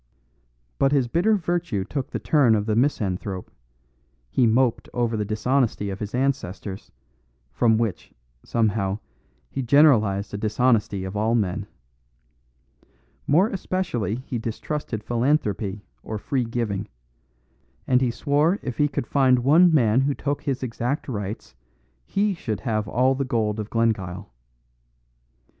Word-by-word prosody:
But 135 - +3
his 135 -4 +2
bitter 180 - +2
virtue 170 - -1
took 135 +3 -4
the - - -3
turn 135 -8 +3
of 105 -1 0
the 110 -1 0
misanthrope; 100 -7 -1 0.8
he 125 - +3
moped 120 +1 +1
over 120 -2 0
the 105 - -1
dishonesty 110 -1 0
of 95 - -6
his 105 +2 -4
ancestors, 110 -7 -3 0.6
from 110 - +3
which, 115 -5 -2 0.3
somehow, 105 -4 0 0.5
he 135 - -2
generalised 110 -8 +4
a 100 - -3
dishonesty 110 -2 +1
of 95 +1 -6
all 110 +3 +1
men. 100 -2 -1 1.6
More 180 +9 +4
especially 175 - -2
he 120 - -3
distrusted 115 0 -4
philanthropy 110 -5 0 0.2
or 110 - -5
free 125 +4 -1
giving; 110 -4 -2 1.0
and 125 0 +3
he 130 - +2
swore 145 +8 +1
if 125 +1 -5
he 145 - +4
could 140 - -3
find 130 -2 +3
one 165 +6 +6
man 125 -5 +4
who 140 +1 0
took 145 0 -2
his 135 -2 -2
exact 125 +3 -2
rights 105 - -5 0.5
he 200 +1 +1
should 110 - -4
have 110 -5 -1
all 130 +4 +2
the 135 +1 -1
gold 110 -4 -1
of 105 0 -5
Glengyle. 100 - -1
115 Hz, 135 wpm, -24 LUFS, 105-140 Hz, 1.6 s, one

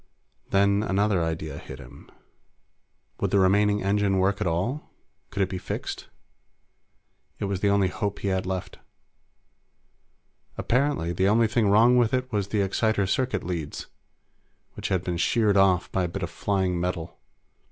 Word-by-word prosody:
Then 100 +1 +3
another 100 -2 +1
idea 80 -1 -4
hit - - -10
him. - - -14 1.1
Would - - 0
the - - +2
remaining 105 +2 +3
engine 100 0 +1
work 100 +2 +1
at 105 - 0
all? 95 - -2 0.4
Could 100 - 0
it 95 - -2
be 95 - -4
fixed? - - -5 1.3
It - - -3
was 100 -1 -2
the 100 - +2
only 100 -2 +3
hope 100 +2 -3
he 100 - -2
had 95 -1 -1
left. 95 0 -5 1.8
Apparently, 125 - 0
the 95 +3 +1
only 115 +3 +4
thing 115 -1 +1
wrong 115 +5 +5
with 120 0 +3
it 130 0 -3
was 100 -3 -1
the 105 0 0
exciter 105 +1 +1
circuit 130 +7 -1
leads, 85 -4 -4 0.9
which - - -5
had 95 -2 0
been 90 -2 -2
sheared 105 +3 +2
off 95 -2 +3
by 95 -1 0
a - - -3
bit 95 +2 -5
of 85 - -4
flying 95 -1 -1
metal. 85 -2 -4
100 Hz, 160 wpm, -25 LUFS, 90-105 Hz, 1.8 s, wrong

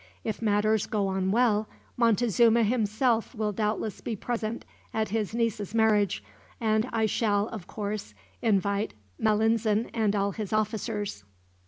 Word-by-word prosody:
If 220 0 -3
matters 215 0 +2
go 210 -2 0
on 190 0 0
well, 215 -1 +2 0.3
Montezuma 235 0 +4
himself 225 +2 +1
will 215 -1 -1
doubtless 215 0 -2
be 230 - -3
present 225 +1 -3 0.3
at 220 -1 0
his 215 +1 -2
niece's 225 -3 -1
marriage; 210 - +3 0.4
and 220 +1 +1
I 225 -1 +1
shall, 210 -1 +1
of 205 -6 -8
course, 205 - -5 0.3
invite 200 - +1 0.2
Malinzin 220 0 +2
and 215 -3 +1
all 200 0 +1
his 210 -1 -5
officers." 210 - -2
215 Hz, 135 wpm, -28 LUFS, 205-225 Hz, 0.4 s, Montezuma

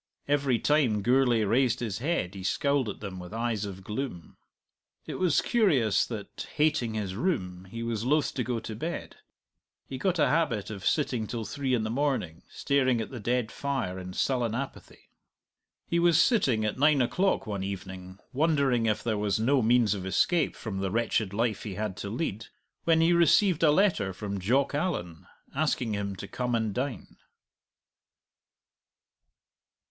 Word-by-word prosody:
Every 140 -3 +2
time 125 -8 +2
Gourlay 125 -2 +3
raised 120 +4 +2
his 110 -5 -3
head 140 - -1
he 95 - -8
scowled 140 +5 +1
at 100 - -7
them 95 -3 -6
with 90 +4 -8
eyes 115 -3 -1
of 95 -1 -8
gloom. 105 - -5 0.7
It - - -6
was 175 -6 +3
curious 150 - +2
that, - - -7
hating 150 -7 +1
his 100 -3 -3
room, 95 - -2
he 115 +5 -6
was 115 -2 -2
loath 145 +4 +1
to 130 - -1
go 120 -1 -2
to 110 - -6
bed. 165 +10 -5 0.7
He 130 - -7
got 185 +3 +1
a - - +4
habit 140 -11 0
of 100 -2 -4
sitting 125 -7 0
till 115 -1 -4
three 130 +4 -1
in 115 - -1
the 110 - -2
morning, 125 - -1
staring 130 -4 +1
at 110 - -4
the 125 - -6
dead 120 +1 -1
fire 130 -10 -3
in 90 0 -7
sullen 120 0 0
apathy. 135 +2 -7 0.7
He 170 - 0
was 170 -2 +4
sitting 135 - +3
at 105 - -2
nine 150 0 +5
o'clock 180 +6 +1
one 100 -3 -3
evening, 95 -1 -7 0.2
wondering 140 -5 +2
if 105 - 0
there 110 -3 -1
was 105 -1 0
no 130 +4 +3
means 115 -1 +3
of 100 -3 -5
escape 160 - +1
from 100 -4 -5
the 95 0 -1
wretched 110 -1 0
life 110 0 -1
he 100 -4 -6
had 105 -2 -3
to 100 - -5
lead, 110 -3 -3 0.4
when 165 -1 +4
he 165 +2 +4
received 170 +1 +4
a 160 - +5
letter 150 - +2
from 100 +1 -4
Jock 130 +11 +1
Allan, 115 - -3 0.3
asking 135 -6 0
him 100 -1 -3
to 100 - -8
come 125 +2 -2
and 110 -3 -1
dine. 125 -2 -4
120 Hz, 170 wpm, -28 LUFS, 105-140 Hz, 0.7 s, nine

